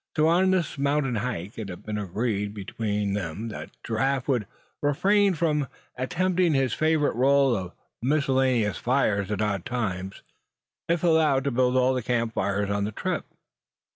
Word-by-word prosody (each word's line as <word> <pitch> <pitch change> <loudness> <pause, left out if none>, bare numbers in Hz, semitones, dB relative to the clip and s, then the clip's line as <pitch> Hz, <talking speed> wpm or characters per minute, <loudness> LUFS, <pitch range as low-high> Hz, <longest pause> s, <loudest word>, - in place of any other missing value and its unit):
So 155 - +4
on 180 +3 +4
this 175 -6 0
mountain 140 -3 +1
hike 105 -3 -4
it 105 -3 -5
had 90 - -8
been 105 -1 -3
agreed 105 +1 -2
between 105 0 -2
them 100 +3 -4
that 110 - -7
Giraffe 130 +4 0
would 120 -8 0 0.3
refrain 195 +7 +3
from 150 -3 0 0.3
attempting 175 +5 +1
his 135 -4 +1
favorite 155 -3 +1
rôle 135 0 +4
of 90 -3 -5 0.3
making 125 - -1
miscellaneous 130 -6 +1
fires 110 -6 +1
at 105 0 -1
odd 100 -4 -1
times, 95 -5 -3 0.7
if 170 0 +1
allowed 155 -5 +3
to 140 - 0
build 125 +1 +2
all 130 +1 +3
the 130 - -1
camp 115 -1 -1
fires 100 0 -1
of 100 0 0
the 105 - -2
trip. - - -3
125 Hz, 165 wpm, -26 LUFS, 105-145 Hz, 0.7 s, So